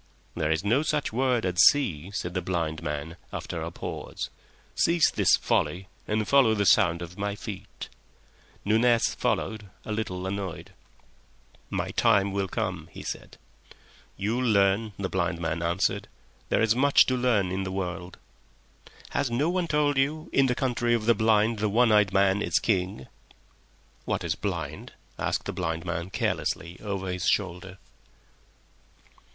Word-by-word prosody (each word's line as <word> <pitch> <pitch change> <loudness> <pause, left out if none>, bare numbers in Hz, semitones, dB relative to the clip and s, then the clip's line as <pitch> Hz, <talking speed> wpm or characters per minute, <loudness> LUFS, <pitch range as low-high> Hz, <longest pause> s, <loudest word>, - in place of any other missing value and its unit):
"There 75 - -1
is 80 +3 +1
no 120 +7 +3
such 150 -6 -1
word 125 -2 +1
as 90 -1 +2
see," 95 - +4
said 95 -4 -4
the 90 - -1
blind 85 -3 -2
man, 75 +2 -4
after - - -5
a - - -3
pause. - - -6 0.4
"Cease 170 -1 +3
this - - +4
folly 95 +1 -1 0.2
and 105 0 0
follow 130 -6 +5
the 100 -1 +1
sound 85 -1 +4
of 85 +3 -10
my 100 0 -2
feet." 105 -2 -8 0.8
Nunez 115 +2 +3
followed, 110 -2 -2 0.2
a - - -5
little 95 -4 -3
annoyed. 95 -3 -5 1.0
"My - - -2
time 100 0 +3
will 100 0 -1
come," - - -3
he - - -9
said. - - -7 0.8
"You'll 110 +6 -1
learn," 100 +1 +2
the 100 - -2
blind 90 -2 -1
man 85 0 -2
answered. 85 +3 0 0.4
"There - - +2
is 110 0 +3
much 140 +3 +5
to 130 - 0
learn 115 -7 +1
in 95 +1 -2
the 95 - -4
world." 90 -1 -4 0.9
"Has 140 -3 0
no 140 +8 +1
one 180 -1 0
told 145 -3 +2
you, 155 +4 -1
'In 135 -1 +4
the 125 - 0
Country 120 -2 +1
of 110 -2 -2
the 115 - +5
Blind 110 0 +2
the 105 0 +1
One 115 +2 +4
Eyed 105 -2 +4
Man 95 +1 +3
is - - +1
King?'" 95 - -1 1.0
"What - - -1
is - - 0
blind?" - - -5 0.3
asked - - -1
the - - -3
blind 80 +1 -3
man, 85 0 -3
carelessly, 85 -2 -2
over 100 -3 -3
his 90 -1 -2
shoulder. 95 0 -1
100 Hz, 155 wpm, -27 LUFS, 90-120 Hz, 1.0 s, follow